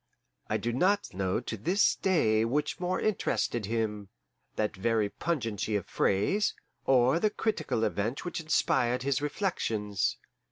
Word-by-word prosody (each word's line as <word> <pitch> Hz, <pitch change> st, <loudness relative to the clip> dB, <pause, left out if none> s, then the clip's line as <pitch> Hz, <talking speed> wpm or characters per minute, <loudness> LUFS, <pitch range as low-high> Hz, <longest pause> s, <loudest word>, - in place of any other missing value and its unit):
I 110 Hz, -, +1 dB
do 115 Hz, +3 st, -2 dB
not 195 Hz, +10 st, +1 dB
know 95 Hz, +1 st, 0 dB
to 115 Hz, -, -4 dB
this 175 Hz, -, +2 dB
day 110 Hz, -, +2 dB
which 135 Hz, +6 st, -1 dB
more 180 Hz, +1 st, -1 dB
interested 120 Hz, -, 0 dB
him 105 Hz, -3 st, -2 dB, 0.5 s
that 105 Hz, -1 st, -1 dB
very 110 Hz, +1 st, +1 dB
pungency 110 Hz, -, -2 dB
of 100 Hz, -, -1 dB
phrase, 105 Hz, -, +1 dB, 0.3 s
or 130 Hz, +4 st, +4 dB
the 215 Hz, -, +3 dB
critical 210 Hz, -, -1 dB
events 110 Hz, -, -1 dB
which 175 Hz, -, -3 dB
inspired 125 Hz, -5 st, +1 dB
his 140 Hz, -1 st, 0 dB
reflections. 115 Hz, -, -1 dB
120 Hz, 135 wpm, -29 LUFS, 105-170 Hz, 0.5 s, or